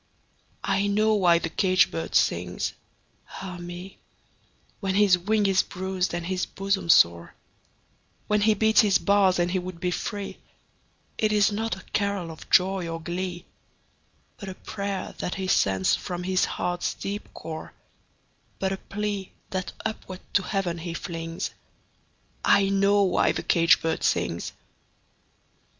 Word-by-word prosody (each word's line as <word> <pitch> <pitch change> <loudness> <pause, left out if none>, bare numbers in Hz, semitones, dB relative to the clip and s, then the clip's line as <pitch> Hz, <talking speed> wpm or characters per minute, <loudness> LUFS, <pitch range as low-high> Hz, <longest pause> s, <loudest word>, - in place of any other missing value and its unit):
I 195 +1 +1
know 215 +2 +3
why 180 -5 +5
the 165 -1 -3
caged 185 0 +3
bird 80 0 -4
sings, 90 +1 +1 0.7
ah 185 -2 -6
me, 175 +2 -8 0.8
When 190 -2 -1
his 200 -2 +6
wing 205 +4 +1
is 195 -1 +4
bruised 190 0 -2
and 175 -1 -4
his 185 0 -1
bosom 195 -3 -2
sore, 85 - +4 0.9
When 210 0 +1
he 215 +1 +4
beats 220 +1 +5
his 205 -3 +4
bars 200 -2 +3
and 175 0 +1
he 185 - +1
would 180 -1 -7
be 180 -1 -1
free; 200 +2 -4 0.8
It 215 -1 +2
is 210 0 +4
not 220 0 -1
a 190 - -12
carol 200 -4 -1
of 160 - -12
joy 185 -1 +3
or 165 0 -4
glee, 175 +1 -4 0.9
But 195 - -7
a 185 - -7
prayer 200 -1 -4
that 180 - -3
he 190 - -3
sends 95 - +2
from 175 - -3
his 185 0 +2
heart's 175 0 -2
deep 200 +1 -5
core, 160 -1 -7 0.8
But 190 0 -1
a 195 - -2
plea, 205 -1 -4 0.2
that 185 -2 -3
upward 190 -3 -5
to 200 - +4
Heaven 185 -3 -2
he 170 0 -5
flings 165 -1 -4 0.9
I 200 -1 +4
know 200 +1 +3
why 185 -2 +2
the - - -4
caged 170 0 +4
bird 160 - -1
sings! 85 - 0
185 Hz, 150 wpm, -26 LUFS, 175-200 Hz, 0.9 s, his